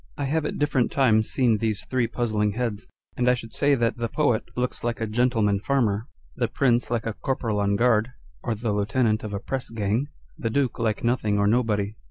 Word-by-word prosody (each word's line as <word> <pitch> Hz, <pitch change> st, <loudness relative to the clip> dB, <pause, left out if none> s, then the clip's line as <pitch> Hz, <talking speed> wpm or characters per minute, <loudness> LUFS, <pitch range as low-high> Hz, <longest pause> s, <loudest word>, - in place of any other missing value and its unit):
I -, -, -2 dB
have 150 Hz, +2 st, 0 dB
at -, -, -4 dB
different 145 Hz, -4 st, +1 dB
times 110 Hz, -5 st, +3 dB
seen 120 Hz, -5 st, +2 dB
these 110 Hz, -2 st, -1 dB
three 125 Hz, -2 st, 0 dB
puzzling 110 Hz, -3 st, 0 dB
heads, 115 Hz, -3 st, -3 dB, 0.3 s
and 125 Hz, 0 st, +2 dB
I 125 Hz, -, +4 dB
should 115 Hz, -2 st, -9 dB
say 145 Hz, 0 st, +3 dB
that 115 Hz, -1 st, 0 dB
the 120 Hz, 0 st, -1 dB
Poet 135 Hz, -6 st, +1 dB
looks 125 Hz, 0 st, -2 dB
like 120 Hz, 0 st, -1 dB
a 115 Hz, -, -1 dB
gentleman 110 Hz, -3 st, +1 dB
farmer, 115 Hz, -3 st, 0 dB, 0.3 s
the -, -, 0 dB
Prince 125 Hz, -3 st, +1 dB
like 115 Hz, -2 st, -1 dB
a 115 Hz, -, -2 dB
corporal 115 Hz, -4 st, -2 dB
on 100 Hz, 0 st, +1 dB
guard, 115 Hz, 0 st, +3 dB, 0.3 s
or 115 Hz, -, -2 dB
the 110 Hz, +1 st, -2 dB
lieutenant 110 Hz, +2 st, +1 dB
of 105 Hz, -, -5 dB
a 100 Hz, -, -3 dB
pressgang, 115 Hz, 0 st, -2 dB, 0.3 s
the 115 Hz, -, -1 dB
Duke 130 Hz, +1 st, 0 dB
like 110 Hz, -2 st, -1 dB
nothing 115 Hz, -4 st, +1 dB
or 100 Hz, -, +2 dB
nobody. 105 Hz, -2 st, +1 dB
115 Hz, 205 wpm, -25 LUFS, 105-125 Hz, 0.3 s, I